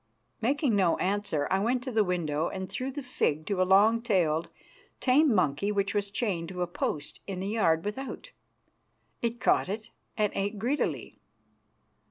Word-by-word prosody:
Making 270 0 +2
no 185 -4 +3
answer, 195 -6 -1
I 190 - +3
went 245 +4 0
to 260 - -4
the 220 -2 +3
window, 165 -4 -1
and 190 -1 -5
threw 255 +8 -4
the 285 +1 -6
fig 155 -11 -1
to 200 -3 0
a 185 - +1
long 215 +4 +5
tailed, 170 -8 +1 0.5
tame 280 +3 +4
monkey 185 -1 +1
which 200 -1 0
was 205 -1 0
chained 195 -6 -2
to 180 -1 -2
a - - +1
post 150 -3 -3
in 190 -2 -4
the 195 +2 -3
yard 170 -7 +2
without. 270 - -5 0.9
It 235 0 -1
caught - - +2
it 215 +2 -5 0.3
and 210 -2 +2
ate 205 +2 -2
greedily. 250 +8 -2
200 Hz, 170 wpm, -29 LUFS, 180-230 Hz, 0.9 s, long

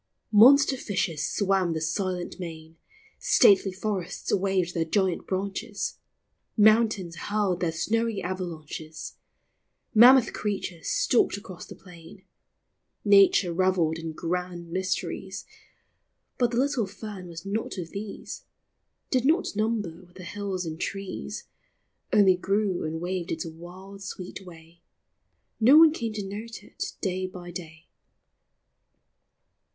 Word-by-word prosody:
Monster 265 +6 +7
fishes 180 -9 -2
swam 190 -4 +1
the 160 - -2
silent 180 +3 -3
main, 160 -2 -8 0.4
Stately 195 -1 +5
forests 190 -2 -3
waved 190 -2 +1
their 165 - 0
giant 185 +1 0
branches, 200 +3 -3 0.6
Mountains 215 -5 +4
hurled 200 -1 -1
their 170 -2 0
snowy 225 +6 -1
avalanches, 165 -4 -6 0.8
Mammoth 245 +2 +7
creatures 195 -5 -4
stalked - - +2
across 185 -3 -10
the - - -10
plain; 170 -3 -15 0.8
Nature 200 -3 +5
revelled 170 -3 +1
in 165 -1 -5
grand 175 +1 -4
mysteries, 185 +1 -3 0.9
But 245 -2 +3
the 235 - -3
little 260 -5 +1
fern 200 -2 -8
was 165 0 -9
not 210 +1 -3
of 170 -3 -6
these, 200 +1 -7 0.7
Did 255 -2 +2
not 320 - +2
number 210 -6 -1
with 175 - -25
the 185 - -10
hills 190 0 -4
and 160 0 -6
trees; 195 -1 -5 0.7
Only 195 -3 +5
grew 195 0 0
and 160 +1 -3
waved 175 0 -3
its 160 - -3
wild 180 +4 -10
sweet 190 0 -7
way, 170 -1 -15 0.8
No 250 +7 +7
one 320 -1 +8
came 230 -7 -3
to 205 -2 -4
note 215 +2 -7
it - - -6
day 185 -1 -1
by 180 -1 -9
day. 165 -2 -9
190 Hz, 125 wpm, -26 LUFS, 175-210 Hz, 0.9 s, one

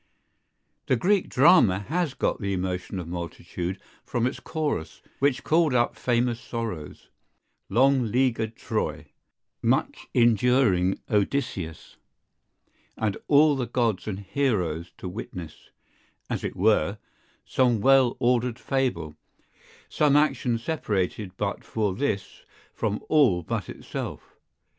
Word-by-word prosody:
The - - +3
Greek 190 - +2
drama 130 - +5
has 155 - -2
got - - -1
the 100 -1 -1
emotion 90 +1 -3
of 90 -3 -5
multitude 90 +1 -5 0.2
from 120 0 -1
its 130 - -2
chorus, 150 - -3 0.2
which 135 -2 +1
called 160 -4 +3
up 120 -1 +2
famous 120 -1 0
sorrows, 110 -12 -6 0.6
long 130 +4 +4
leaguered 115 -3 +1
Troy, - - -3 0.5
much - - 0
enduring 115 -5 +3
Odysseus, 100 - -2 1.0
and 110 -3 0
all 150 0 +5
the 125 -3 -2
gods 115 -5 0
and 100 -2 -4
heroes 95 - -1
to - - -7
witness, 90 -4 -8 0.6
as - - -2
it - - -3
were, 100 -1 +2 0.5
some 125 -4 +2
well 130 +1 +4
ordered 120 -1 +1
fable, 125 - -1 0.7
some 145 -2 +2
action 135 -5 +2
separated 105 - -2
but 100 -1 -2
for 105 -4 -1
this 105 -4 -3 0.3
from 105 -2 -2
all 125 - +4
but - - -3
itself. - - -7
115 Hz, 115 wpm, -26 LUFS, 95-135 Hz, 1.0 s, drama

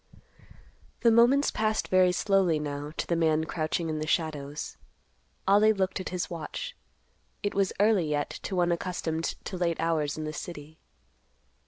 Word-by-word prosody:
The 230 - +5
moments 245 +5 +5
passed 215 0 0
very 185 -1 +5
slowly 185 -3 +2
now 145 0 -4
to - - -1
the 170 - 0
man 160 -1 +2
crouching 160 +1 -2
in 155 -1 -2
the 155 - -3
shadows. 150 -3 -2 0.7
Ollie 210 +2 +6
looked 195 -1 -1
at 185 - -4
his 180 -2 -2
watch. 175 - -6 0.7
It 205 - -1
was 195 -1 +1
early 205 -6 +3
yet 145 -1 -1
to 195 - -4
one 175 -1 +2
accustomed 165 -2 -2
to 185 - -4
late 170 -2 0
hours 155 -3 0
in 155 - -4
the 155 0 -4
city. 155 -1 -8
170 Hz, 160 wpm, -28 LUFS, 155-195 Hz, 0.7 s, Ollie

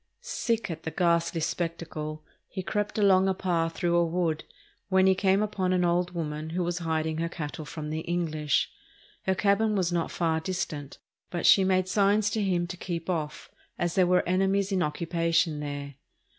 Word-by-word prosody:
Sick 230 - -1
at 160 0 -6
the 160 - -4
ghastly 170 -1 +1
spectacle, 155 -2 -3 0.2
he 190 - -5
crept 210 +3 -2
along 195 -2 +5
a 190 - +1
path 165 -3 0
through 175 -1 +1
a 175 - +5
wood, 165 -2 0 0.5
when 190 0 +4
he 190 - +6
came 190 +2 +2
upon 195 -3 0
an 180 -1 +2
old 175 +1 +1
woman 155 -1 -3
who 180 +2 -1
was 175 +1 -2
hiding 160 -1 -1
her 170 0 -1
cattle 155 -2 -6
from 150 0 -6
the 155 - -2
English. 160 -3 0 0.6
Her 190 - +3
cabin 210 +2 +2
was 180 -3 +1
not 170 -1 0
far 165 -2 0
distant, 160 -5 -4 0.3
but 175 - -3
she 195 - +7
made 185 -1 +2
signs 205 +2 +3
to 220 - 0
him 180 -3 +1
to 180 +1 -7
keep 175 0 -3
off, 155 -3 -4 0.3
as 175 -1 -1
there 185 -2 +4
were 180 -1 +3
enemies 195 +2 +2
in 190 -2 +1
occupation 165 0 0
there. 145 -1 -5
175 Hz, 185 wpm, -28 LUFS, 160-190 Hz, 0.6 s, she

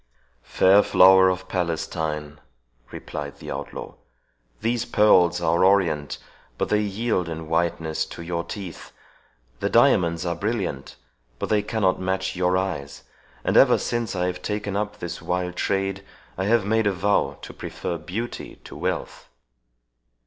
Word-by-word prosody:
"Fair 95 +2 +5
flower 95 -1 +6
of 95 0 -3
Palestine," 80 -4 -3 0.5
replied 70 -1 -7
the - - -8
outlaw, - - -6 0.7
"these 115 +2 0
pearls 90 -4 +4
are 85 +1 +2
orient, 90 -7 +2 0.4
but - - -1
they 105 0 +2
yield 105 -3 -1
in 80 -1 -6
whiteness 80 -1 0
to 85 - -8
your 85 0 -2
teeth; 95 -4 -8 0.7
the - - 0
diamonds 85 0 +3
are 85 - 0
brilliant, 95 - -3 0.4
but - - -4
they 105 -1 +3
cannot 100 -5 0
match 95 0 -1
your 90 0 +2
eyes; 95 -7 -4 0.4
and - - 0
ever - - +7
since 120 -4 -2
I 90 0 0
have 90 0 -3
taken 105 -1 -3
up 105 0 -2
this 85 -1 -6
wild 90 0 -2
trade, 95 +1 -1 0.3
I 95 - -2
have 110 -1 +3
made 110 +1 +2
a 100 - +2
vow 100 +3 +1
to - - -8
prefer 85 -2 -5
beauty 100 +10 -5
to - - -11
wealth." - - -4
95 Hz, 145 wpm, -24 LUFS, 85-100 Hz, 0.7 s, ever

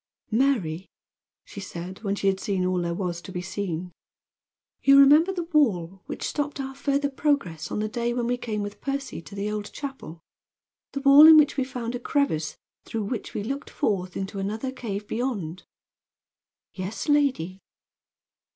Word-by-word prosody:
"Mary," 215 - +1 0.6
she - - -9
said, 185 0 -7
when 200 -2 -1
she 200 - -4
had 190 -1 +2
seen 190 -3 -1
all 185 -1 +1
there 170 0 -1
was 175 -2 -3
to 190 - -10
be 180 - -4
seen, 180 -2 -4 0.9
"you 275 0 +7
remember 300 +6 +7
the 360 -2 -3
wall 190 - +2
which - - -5
stopped 290 -1 -3
our 270 0 -4
further 280 +1 0
progress 265 - -1
on - - -3
the 215 0 0
day 235 +2 -1
when 240 0 -1
we 245 +1 +1
came 215 -4 -3
with 205 0 -7
Percy 275 -7 -3
to 165 +5 -12
the 205 +1 -2
Old 210 -1 -4
Chapel 270 - -7 0.7
the 275 - -3
wall 280 +2 +9
in 320 -1 +10
which 300 -2 +5
we 270 - +1
found 250 -3 -5
a 245 - -3
crevice 240 - 0 0.3
through 225 -2 -3
which 210 +2 -5
we 205 - -2
looked 275 +6 -4
forth 185 -3 -1
into 195 +1 -4
another 220 +7 -3
cave 210 -5 -5
beyond?" 205 -9 -3 1.1
"Yes, 195 +8 -5
lady." 265 - +1
215 Hz, 170 wpm, -26 LUFS, 185-275 Hz, 1.1 s, in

